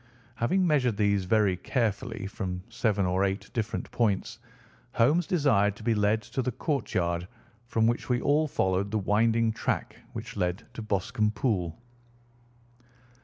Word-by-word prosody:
Having 185 +12 +2
measured 130 - +2
these 100 -2 +2
very 105 -1 +3
carefully 115 0 -2
from 95 -2 -4
seven 110 -4 +1
or 90 +2 +1
eight 95 0 -2
different 115 -1 -3
points, 115 0 0 0.5
Holmes 150 +9 +3
desired 115 - +3
to 110 - -12
be 115 0 +2
led 105 +1 +2
to 130 - -3
the 125 0 -1
court 145 0 -2
yard, 85 -1 0 0.4
from 115 -2 +2
which 120 +3 0
we 125 -1 +2
all 150 +4 +2
followed 95 -5 0
the 110 - 0
winding 110 +3 +2
track 110 - -2 0.2
which - - -7
led 90 +3 -1
to - - -6
Boscombe 105 0 0
Pool. 95 -8 -1
110 Hz, 150 wpm, -28 LUFS, 100-120 Hz, 0.5 s, very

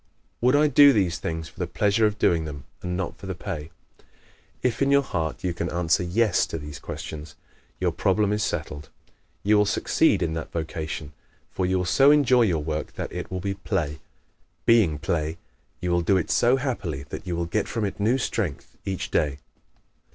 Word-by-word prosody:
_ - - -45 0.4
Would 125 +3 +4
I 150 +1 +5
do 145 -1 +7
these 90 -7 +1
things 80 0 -4
for - - -17
the 90 - -1
=pleasure= 105 +5 +2
of 105 0 -3
doing 85 -5 +2
them 70 -3 -7 0.2
and 90 0 -3
not 95 -2 -4
for 95 - -8
the 95 - -3
=pay=? 80 -2 -5 0.9
If, 125 -1 0
in 140 - +3
your 140 0 +5
heart, 80 - -3
you 90 -2 0
can 85 0 -3
answer 85 +1 +1
"Yes" 100 +3 +2
to - - -4
these 75 -2 -8
questions, 75 0 -7 0.4
your - - +1
problem 105 +1 +1
is 105 - -1
settled; 75 -6 -3 0.5
you 105 +1 +4
will 105 - +3
succeed 110 - +2
in 80 -1 -1
that 80 -1 -5
vocation. 80 -2 -4 0.4
For 95 - -1
you 95 0 +1
will 90 - -1
so 135 +10 +5
enjoy 135 -4 +5
your 85 -7 0
work 75 0 -3
that - - -5
it - - -5
will 95 -1 -4
be 100 +1 -1
play. 95 -7 -2 0.7
Being 105 -10 +4
play, 80 +1 -2 0.4
you 90 -1 -1
will 85 0 +3
do 95 +3 +3
it 90 - -1
so 120 +2 +4
happily 110 - -3
that - - -7
you 90 - -1
will 85 0 -1
get 100 +5 -1
from 110 -2 -2
it 100 0 -4
new 115 +6 +2
strength 105 - -3
each 95 -2 -4
day. 70 -2 +1
90 Hz, 205 wpm, -25 LUFS, 80-110 Hz, 0.9 s, do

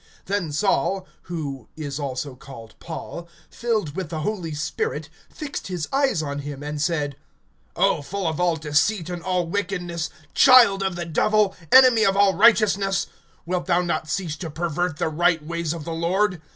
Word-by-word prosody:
(9)Then 190 -5 -1
Saul 185 +3 +1 0.2
(who 140 -8 -5
is 145 -2 -5
also 140 -1 -4
called 125 -4 -12
Paul), 170 +1 -7 0.2
filled 215 -11 -2
with 185 -5 -4
the 160 -2 -4
Holy 175 -4 -3
Spirit, 440 - -3 0.2
fixed 295 -3 -6
his 180 -4 -3
eyes 270 - +2
on 140 -1 -4
him, 145 -1 -7
(10)and 150 0 -4
said: 145 -3 -1 0.6
O - - +2
full 190 +7 -4
of 160 -1 -1
all 175 -2 +2
deceit 160 +4 0
and 175 -1 -5
all 180 -1 0
wickedness, 175 -3 -3 0.2
child 245 -7 +7
of 190 -2 -1
the 175 0 -4
Devil, 205 +4 +2 0.2
enemy 255 -4 +7
of 195 -2 +3
all 200 -1 +5
righteousness, 200 -2 +3 0.4
wilt 180 +1 -2
thou 175 0 +3
not 170 -2 -2
cease 165 -3 -2
to 165 -1 -6
pervert 170 +1 -2
the - - 0
right 165 0 +1
ways 170 -1 -2
of 165 -2 -5
the 165 - -4
Lord? 180 +2 0
170 Hz, 170 wpm, -23 LUFS, 155-195 Hz, 0.6 s, child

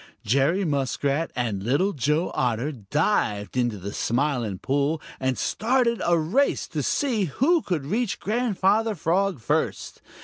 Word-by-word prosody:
Jerry 140 - +2
Muskrat 140 +1 0
and 115 -6 -1
Little 145 - +1
Joe 150 +5 0
Otter 125 +3 0
dived 110 - -1
into 120 -4 0
the 100 +2 -6
Smiling 120 -5 -1
Pool 140 - 0 0.2
and 130 -1 0
started 235 0 +1
a 175 0 +3
race 195 - +1
to - - -2
see 245 -9 0
who 305 - +2
could 165 - -2
reach 220 - -1
Grandfather 215 -1 +1
Frog 180 +1 0
first. 110 - -2
150 Hz, 135 wpm, -25 LUFS, 125-200 Hz, 0.2 s, a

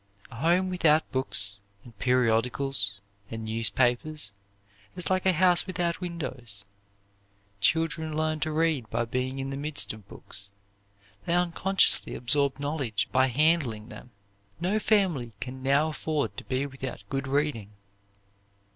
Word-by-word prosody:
A - - -10
home 175 +7 +2
without 160 -3 +3
books 100 -6 +2 0.2
and 120 -3 -15
periodicals 125 -3 +2 0.3
and 110 -1 -6
newspapers 120 +5 0 0.6
is 180 0 -3
like 185 0 +1
a - - +6
house 180 +2 +4
without 175 -1 -2
windows. 130 - -5 0.9
Children 160 +4 +1
learn 155 0 0
to 155 +1 -1
read 155 -7 0
by 115 +2 -1
being 130 +3 -3
in 135 0 -4
the 135 - -4
midst 145 -3 +3
of 105 -3 -14
books; 100 0 -7 0.8
they 170 - +1
unconsciously 180 +2 +3
absorb 140 +3 +1
knowledge 140 -8 -2
by 130 +1 +4
handling 130 -6 +1
them. 125 - -11 0.5
No 190 +5 0
family 185 - +1
can 125 +2 -7
now 140 +4 +2
afford 150 -9 -2
to - - -7
be 130 +2 -1
without 130 -6 -7
good 135 0 -2
reading. 140 -7 -1
135 Hz, 135 wpm, -27 LUFS, 120-160 Hz, 0.9 s, a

